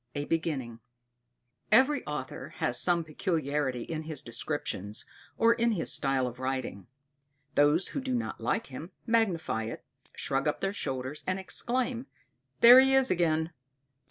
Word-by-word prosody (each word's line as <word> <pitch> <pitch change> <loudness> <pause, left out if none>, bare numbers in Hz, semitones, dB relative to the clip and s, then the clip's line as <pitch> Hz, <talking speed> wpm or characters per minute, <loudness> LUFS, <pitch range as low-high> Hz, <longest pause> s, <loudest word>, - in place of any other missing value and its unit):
A 145 0 -2
Beginning 140 -9 -2 0.9
Every 265 +6 +4
author - - -6
has - - +1
some 175 -2 +3
peculiarity 150 - -2
in 160 -1 -5
his 155 -1 -5
descriptions 115 -4 -4 0.3
or 230 +1 +5
in 235 0 +1
his 180 - +2
style 135 -2 +2
of 125 0 -6
writing. 130 -8 -4 0.7
Those 150 +5 +3
who 280 - -4
do 260 -1 -2
not 240 - -4
like 230 - -1
him, 150 +6 -9 0.2
magnify 190 - 0
it, 115 - -7 0.3
shrug 135 +1 -1
up 150 - -1
their 195 0 -2
shoulders, 130 -4 -4
and 185 0 0
exclaim 245 +6 -2 0.5
there 245 +2 +10
he 265 0 +5
is 265 -4 +4
again! 165 -2 +1
160 Hz, 145 wpm, -29 LUFS, -, 0.9 s, there